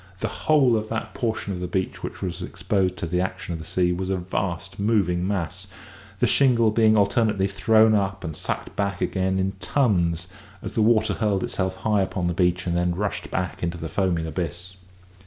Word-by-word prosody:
The - - -5
whole 135 -6 +5
of 110 0 -2
that 110 - -4
portion 110 -4 -2
of 90 - -5
the 90 - -3
beach 95 +1 -2
which - - -6
was 90 -1 -4
exposed 95 0 -1
to - - -3
the 90 +2 0
action 90 -1 -4
of 80 - -4
the 80 - -8
sea 90 -1 +1
was 90 +2 -2
a 95 - +1
vast 90 0 -3
moving 95 -4 +1
mass, 95 -1 -3 0.5
the - - +3
shingle 120 -5 +4
being 110 0 +4
alternately 100 -1 +2
thrown 110 +2 +4
up 95 -2 0
and 80 -3 -4
sucked - - -4
back 100 -2 -1
again 95 0 0
in 95 0 0
tons, 85 - +1 0.4
as - - -5
the 110 - +1
water 110 0 +3
hurled 105 -4 0
itself 95 -1 -2
high 105 -1 +1
upon 95 -1 -2
the 85 - +1
beach 90 +1 +1
and 85 -1 0
then 85 0 +1
rushed 100 +2 -3
back 90 -2 -3
into 85 0 -2
the 80 -1 -5
foaming 90 -4 0
abyss. 90 +2 -5
95 Hz, 200 wpm, -24 LUFS, 90-105 Hz, 0.5 s, whole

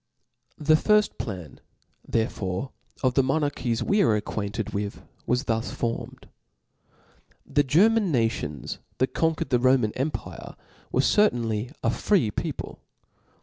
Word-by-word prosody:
The 155 +1 +3
firft 210 +6 +3
plan 90 - -6 0.5
therefore 110 +1 -2 0.3
of 130 -1 +3
the 135 - +4
monarchies 135 -4 0
we 205 +1 +2
are 115 - +4
acquainted 105 +1 -3
with, 100 0 -4 0.2
was 125 +2 +1
thus 115 -3 -1
formed. 115 -1 -4 1.2
The 145 - +2
Ger 155 +9 +5
man 225 -5 +1
nations 115 - -1 0.2
that 130 - 0
conquered 160 -1 0
the 125 - +4
Roman 130 -3 +3
empire^ 140 +6 -4 0.4
were 130 - +3
certainly 120 - +2
a - - +3
free 175 - +2
people. - - -5
125 Hz, 125 wpm, -26 LUFS, 110-155 Hz, 1.2 s, Ger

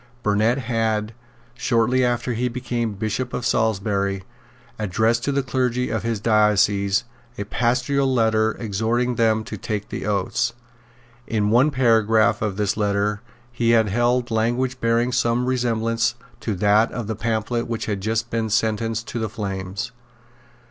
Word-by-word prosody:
Burnet 110 +4 +2
had, 115 -3 -1 0.4
shortly 120 +1 +1
after 120 0 0
he 120 +2 0
became 120 -3 -3
Bishop 110 +5 -3
of 120 - -3
Salisbury, 100 -4 0 0.6
addressed 110 +4 +1
to 145 - +1
the 140 0 0
clergy 125 -1 -1
of 110 -2 -1
his 115 0 -2
diocese 105 -2 +3 0.3
a 100 - -2
Pastoral 125 +5 +1
Letter, 110 -2 +2
exhorting 115 +3 0
them 110 -2 +2
to - - -7
take 105 -2 -4
the - - -4
oaths. 105 +4 0 0.7
In 105 -2 0
one 125 +6 +5
paragraph 115 -4 +3
of 105 -3 -2
this 105 -2 0
letter 105 0 0 0.3
he 120 -1 0
had 110 -2 +2
held 120 +3 +1
language 120 +3 0
bearing 115 +2 +2
some 120 0 +1
resemblance 115 -2 0 0.2
to 110 - -2
that 105 +4 +3
of 120 - -4
the 110 +1 -3
pamphlet 115 +2 -1
which 115 -1 -3
had 100 -3 -3
just 110 +3 -1
been 115 -1 -1
sentenced 110 +1 0
to 120 - -3
the 110 -1 -2
flames. 100 0 -4
115 Hz, 150 wpm, -22 LUFS, 105-120 Hz, 0.7 s, one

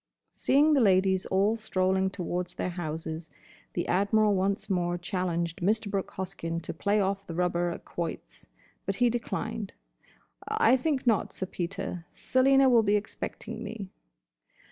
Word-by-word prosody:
Seeing 295 +3 +4
the 280 - +4
ladies 190 -2 +3
all 200 +4 +2
strolling 190 -3 +1
towards 180 -1 -3
their 180 - -2
houses 160 -1 -5 0.4
the 175 - -2
Admiral 205 +3 +3
once 195 +2 0
more 175 -2 0
challenged 175 -1 -2
Mr. 205 +2 +1
Brooke 195 -2 -2
Hoskyn 170 -3 -4
to - - -4
play 200 +5 +1
off 195 0 -1
the 165 - -5
rubber 175 0 +1
at 170 - -7
quoits. 170 -2 -6 0.4
But 195 - 0
he 245 +2 +3
declined. 225 -3 -3 0.7
"I 235 - +4
think 270 0 0
not, 225 -4 +2
Sir 190 - -3
Peter. 180 -1 -4
Selina 270 +1 +4
will 240 -3 +6
be 210 -1 +2
expecting 210 +1 -4
me." 205 -3 -6
195 Hz, 145 wpm, -28 LUFS, 175-220 Hz, 0.7 s, will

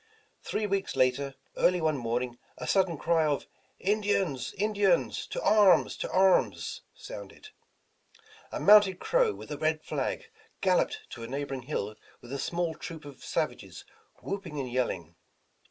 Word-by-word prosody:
Three 215 - -2
weeks 195 -1 -1
later, 135 +2 +1 0.2
early 180 0 +3
one 155 -2 +1
morning, 120 0 -2 0.2
a 125 - -6
sudden 185 +2 +2
cry 165 +2 +2
of 145 -2 -1 0.3
"Indians! 195 -8 0
Indians! 205 -1 +1
to - - -4
arms! 205 -3 +5
to - - -3
arms!" 190 0 +2
sounded. - - -10 1.0
A - - -3
mounted 205 -3 +7
Crow, 475 - +2
with - - -10
a 145 - -4
red 155 0 0
flag, - - -3 0.3
galloped - - +2
to 120 - -8
a 115 - -5
neighbor 140 +2 -4
ing 130 - -4
hill 115 -6 -3 0.3
with 120 +2 -10
a 140 - -3
small 170 +1 -1
troop 160 -2 -8
of 140 -3 -11
savages - - -3 0.4
whooping 185 -7 -4
and 130 -3 -4
yelling. 85 -10 -2
160 Hz, 150 wpm, -29 LUFS, 135-200 Hz, 1.0 s, mounted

